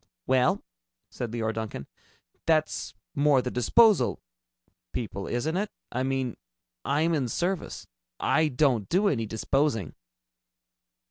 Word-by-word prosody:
"Well," 130 -1 +2 0.5
said 120 - -4
Leora 110 -1 -1
Duncan, 110 -11 -5 0.6
"that's 155 -1 +1 0.2
more 145 -1 +4
the 125 0 -2
disposal 210 - +4 0.7
people, 100 -5 -4
isn't 120 +8 -1
it? 205 +3 0 0.2
I 125 - -1
mean, 130 -2 -1 0.5
I'm 160 +4 +1
in 140 -6 +1
service. 175 +8 -2 0.3
I 155 +1 +3
don't 125 -7 +1
do 195 +4 +3
any 115 -6 -1
disposing." 110 - 0
130 Hz, 115 wpm, -27 LUFS, 115-155 Hz, 0.7 s, more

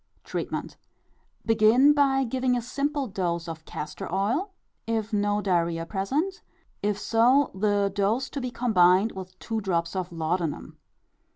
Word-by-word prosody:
Treatment. - - -4 0.7
Begin 225 +6 +5
by 275 -2 +3
giving 255 0 0
a - - -2
simple 280 +3 -1
dose 175 -5 -2
of 160 -1 -7
castor 150 +1 -6
oil, 225 - 0 0.4
if 225 -1 -2
no 205 0 +1
diarrhœa 170 -3 0
present; 285 - -2 0.4
if 205 -1 0
so, 245 +7 +3
the 200 0 +1
dose 215 +6 +1
to 280 - -4
be 250 - -3
combined 210 -4 +3
with 185 -1 -9
two 225 +2 -3
drops 170 -2 -1
of 185 -1 -3
laudanum. 165 -1 -3
210 Hz, 135 wpm, -26 LUFS, 185-250 Hz, 0.7 s, Begin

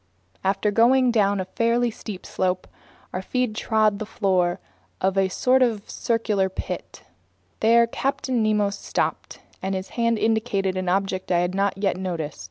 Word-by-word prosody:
After 195 +2 +1
going 245 +3 +4
down 205 -3 +2
a 185 - -2
fairly 235 +4 +1
steep 210 -3 -8
slope, 185 -1 -1 0.5
our 185 - -2
feet 250 +3 -1
trod 215 -1 +1
the 215 - -3
floor 185 -5 +1 0.4
of 190 +1 +1
a 195 -1 +2
sort 255 +7 +2
of 225 -5 +1
circular 215 -4 0
pit. 190 - -6 0.6
There 235 +1 +5
Captain 255 0 -1
Nemo 210 -2 +2
stopped, - - -3 0.2
and 190 +1 -2
his 190 0 -5
hand 230 -1 +1
indicated 215 -4 0
an 185 -1 -1
object 190 0 -1
that 175 - +2
I - - +3
hadn't 190 +2 0
yet 195 -2 0
noticed. 170 - -4
200 Hz, 160 wpm, -24 LUFS, 190-230 Hz, 0.6 s, There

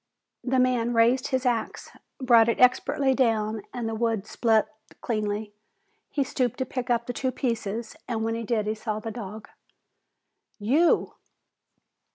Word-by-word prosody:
The 260 0 0
man 245 -2 +2
raised 235 +3 +3
his 260 0 -1
axe, 240 -2 -2 0.3
brought 235 -3 +5
it 230 - 0
expertly 265 +2 +3
down, 220 -4 +1
and 240 -2 -4
the 225 - -3
wood 225 -2 -1
split 220 -1 +2 0.3
cleanly. 210 -2 -2 0.6
He 285 - 0
stooped 255 -3 -1
to 260 - -1
pick 250 0 -5
up 235 -1 +1
the 245 - -4
two 260 +1 -1
pieces 230 -3 -3
and 225 -3 -2
when 225 0 -1
he 230 - -3
did 220 -1 0
he 215 - 0
saw 215 -1 -4
the 225 +1 -5
dog. 215 -1 -8 1.1
"You!" 275 +11 +2
230 Hz, 155 wpm, -26 LUFS, 220-255 Hz, 1.1 s, brought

